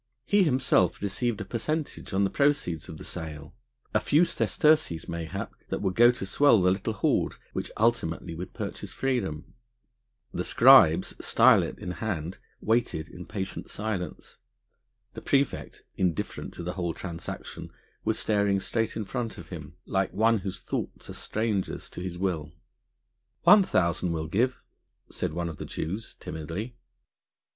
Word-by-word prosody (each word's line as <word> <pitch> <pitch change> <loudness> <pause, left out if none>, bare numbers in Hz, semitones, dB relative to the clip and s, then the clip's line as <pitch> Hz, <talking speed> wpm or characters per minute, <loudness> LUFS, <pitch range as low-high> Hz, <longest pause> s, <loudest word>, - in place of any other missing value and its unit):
He 205 0 +4
himself 135 -7 +3
received 105 +2 -1
a - - -4
percentage 150 +9 -3
on 100 0 +2
the 95 - +1
proceeds 140 - +1
of 80 - -7
the - - -10
sale, 75 -3 -6 0.4
a - - +4
few 155 +5 +4
sesterces 155 - +2
mayhap 85 -2 -4 0.2
that - - -2
would 95 -2 +1
go 120 +4 +7
to 125 -5 -1
swell 140 +2 +5
the 90 0 +4
little 100 +4 -1
hoard 100 - +1 0.2
which - - -3
ultimately 90 -7 +1
would 90 +3 -6
purchase - - -6
freedom. 105 - -2 0.8
The - - -1
scribes - - +6
stilet - - +5
in 90 - -5
hand 90 -1 -4 0.2
waited 110 -8 0
in 90 0 -10
patient 95 -3 -5
silence. 100 -4 -4 0.8
The - - -8
praefect, 140 -2 0
indifferent 90 -4 -2
to - - -6
the 90 +1 -3
whole 85 -3 -2
transaction, 85 -3 -7 0.3
was - - +1
staring 100 -2 +2
straight 115 +3 -1
in 110 -1 -3
front 120 +1 -4
of 85 - -10
him, 80 -2 -8
like 95 -1 0
one 110 +2 +3
whose 95 -1 -6
thoughts - - -4
are - - -7
strangers 110 -3 -2
to - - -7
his 90 -1 -5
will. 85 -6 -2 0.9
"One 210 0 +9
thousand 85 - +1
we'll 80 -1 -2
give," 120 +10 0 0.5
said - - -2
one 85 +1 -2
of 80 -3 -6
the - - -6
Jews 95 +8 -5
timidly. 85 +10 -5
95 Hz, 150 wpm, -28 LUFS, 85-115 Hz, 0.9 s, One